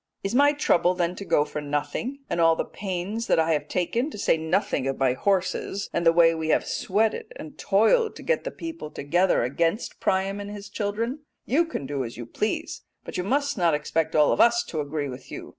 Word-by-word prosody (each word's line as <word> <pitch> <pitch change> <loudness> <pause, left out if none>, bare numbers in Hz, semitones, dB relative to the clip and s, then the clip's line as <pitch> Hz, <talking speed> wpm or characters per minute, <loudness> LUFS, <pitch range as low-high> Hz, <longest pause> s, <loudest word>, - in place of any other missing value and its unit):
Is 195 - -2
my 285 +3 +5
trouble 180 - +2
then 175 0 -1
to - - -6
go 165 -4 +3
for 150 - -5
nothing, 145 - -3
and 170 - -1
all 165 0 +5
the - - -2
pains 200 +4 -4
that - - +3
I 160 0 +2
have 150 - -1
taken, 230 - -1
to 295 - -9
say 200 - +2
nothing 160 -3 0
of 135 - -2
my 130 -2 +2
horses, 195 +4 -1
and 170 - 0
the 165 - +6
way 165 0 +5
we 160 -1 -3
have - - +2
sweated 215 +3 -1
and 155 - -9
toiled 225 - +2
to - - -10
get 485 - 0
the - - -3
people 330 - -7
together 175 +2 +1
against 165 - -1
Priam 195 +1 0
and 205 0 -6
his 205 -1 -8
children? 225 +7 -2 0.3
You 320 +7 +2
can 320 - -5
do 140 -1 -2
as 115 -1 -7
you 120 - -6
please, 210 - -3 0.2
but - - -8
you 180 - -1
must 280 +3 0
not 170 -3 +3
expect 155 +2 -1
all 150 -1 +5
of - - +3
us 235 0 +5
to 155 - -2
agree 145 0 -3
with 130 0 -9
you.' - - -7
180 Hz, 225 wpm, -25 LUFS, 155-215 Hz, 0.3 s, the